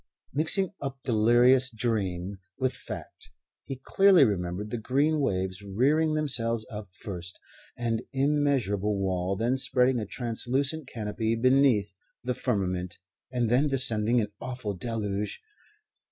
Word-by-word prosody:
Mixing 170 +7 +2
up 135 -1 -5
delirious 120 +3 +4
dream 100 -5 -2 0.2
with 130 -1 0
fact, - - -8 0.4
he 135 - -5
clearly 195 -6 +6
remembered 100 0 -2
the 120 - -2
green 145 +7 +1
waves 95 -7 -1
rearing 140 +11 +1
themselves 115 -7 0
up 105 -1 -6
first, 95 -3 -7 0.4
an 115 -2 -1
immeasurable 135 -8 +1
wall, 95 -1 -1
then 120 +6 0
spreading 130 -2 +2
a 105 - -4
translucent 130 +6 -1
canopy 110 0 -2
beneath 125 -4 +3 0.3
the 125 +1 -1
firmament 90 -8 -2 0.3
and 120 -2 0
then 125 +6 +3
descending 120 -4 +2
in 105 -3 0
awful 125 -5 -4
deluge. 105 0 -3
115 Hz, 125 wpm, -27 LUFS, 105-135 Hz, 0.4 s, clearly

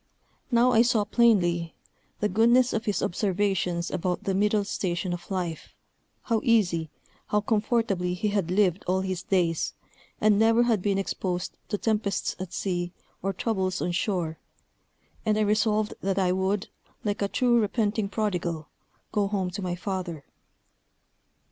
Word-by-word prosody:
Now 245 0 +4
I 230 -2 +6
saw 235 -3 +3
plainly 175 -9 +2 0.5
the 210 - +3
goodness 235 +5 +4
of 225 +1 -1
his 205 -5 0
observations 185 -2 0
about 180 0 -2
the 195 - 0
middle 210 +2 +2
station 180 -2 -2
of 175 - -7
life, 180 -4 -4 0.5
how 225 -3 0
easy, 180 -9 +2 0.4
how 210 - +1
comfortably 210 -4 0
he 210 +4 -1
had 200 -4 0
lived 185 -1 +2
all 185 +1 +2
his 185 -2 -3
days, 175 -4 0 0.4
and 210 -1 +4
never 225 +2 +5
had 230 -5 +2
been 200 0 +1
exposed 185 -2 -2
to 205 - 0
tempests 210 -2 -1
at 185 -1 -5
sea, 175 -2 -2 0.3
or 195 - 0
troubles 190 -2 -1
on 175 - -1
shore; 175 -3 -1 0.8
and 215 -1 +1
I - - +2
resolved 215 0 +2
that 195 0 -1
I 185 -2 +2
would, 190 +2 0 0.3
like 205 -1 -2
a 200 - +2
true 240 +2 +3
repenting 210 -1 0
prodigal, 180 -7 -2 0.4
go 205 -1 +1
home 195 -3 -1
to 190 - -5
my 180 -2 -2
father. 180 -6 -4
195 Hz, 150 wpm, -27 LUFS, 180-215 Hz, 0.8 s, I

